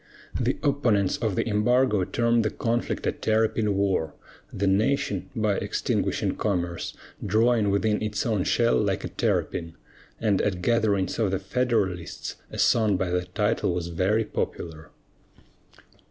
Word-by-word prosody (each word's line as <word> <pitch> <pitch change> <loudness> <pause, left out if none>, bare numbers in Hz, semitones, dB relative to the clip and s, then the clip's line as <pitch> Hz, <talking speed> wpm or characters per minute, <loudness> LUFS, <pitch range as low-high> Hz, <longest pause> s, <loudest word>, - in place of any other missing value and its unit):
The - - 0
opponents 120 -9 +2
of 110 -5 -1
the - - 0
embargo 110 0 +2
termed 115 +1 +2
the 110 - +1
conflict 120 0 -2
a - - +2
"terrapin 110 -1 +1
war," 95 -6 0 0.4
the 100 - -2
nation, 100 0 +1
by 105 -3 +1
extinguishing - - -1
commerce, 90 -5 -2 0.3
drawing 110 +1 +3
within 105 +2 +1
its 105 -1 -2
own 110 -6 +1
shell 120 +4 +2
like 100 -2 -1
a - - -4
terrapin; 85 -1 -1 0.4
and 105 -4 +2
at 90 -3 -1
gatherings 110 -4 +1
of 110 -4 +2
the 95 - 0
Federalists, 95 -4 -2
a - - -8
song 110 -4 +3
by 90 -1 -1
that 90 0 -2
title 105 -4 +1
was 85 -1 -3
very 95 +6 +1
popular. 80 -2 -5
105 Hz, 140 wpm, -26 LUFS, 95-115 Hz, 0.4 s, drawing